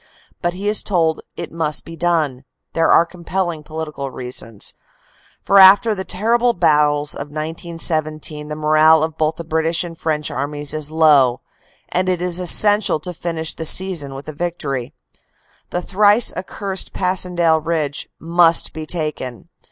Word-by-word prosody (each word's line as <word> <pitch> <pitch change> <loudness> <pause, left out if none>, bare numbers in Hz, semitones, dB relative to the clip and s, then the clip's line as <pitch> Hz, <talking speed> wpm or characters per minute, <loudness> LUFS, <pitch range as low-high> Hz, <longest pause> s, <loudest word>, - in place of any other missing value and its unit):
But 175 0 -1
he 200 +3 -5
is 210 0 +3
told 165 -5 0 0.2
it 170 - -6
must 160 -2 -2
be 165 - -9
done 160 -6 -1 0.3
there 165 0 +1
are 170 - +5
compel 180 +2 -3
ling 160 -3 -6
political 150 -3 -6
reasons; 125 -4 -4 0.7
for 200 - +4
after 205 +4 +7
the 190 -2 -5
terrible 235 +6 +1
battles 150 -4 +2
of 140 - -6
1917 155 -1 -3
the 150 - -5
morale 155 +1 +4
of 160 -1 -3
both 155 0 0
the 170 - -7
British 160 +1 0
and 170 -1 -8
French 155 -2 -2
armies 145 0 -3
is 155 -1 -2
low, 150 -6 +3 0.5
and 185 +1 0
it 180 -2 0
is 180 0 +2
essential 205 +1 +4
to 180 +4 -6
finish 165 -1 -4
the 160 - -7
season 160 -5 +2
with 135 +2 -10
a 155 - -6
victory. 145 -6 -4 0.7
The 175 - -3
thrice 205 +4 +3
ac 185 - -5
cursed 195 -2 -3
Passhendaele 175 -3 +1
Ridge 155 -3 -3
must 170 0 +3
be 155 -1 -7
taken. 150 -5 -5
160 Hz, 160 wpm, -18 LUFS, 150-180 Hz, 0.7 s, after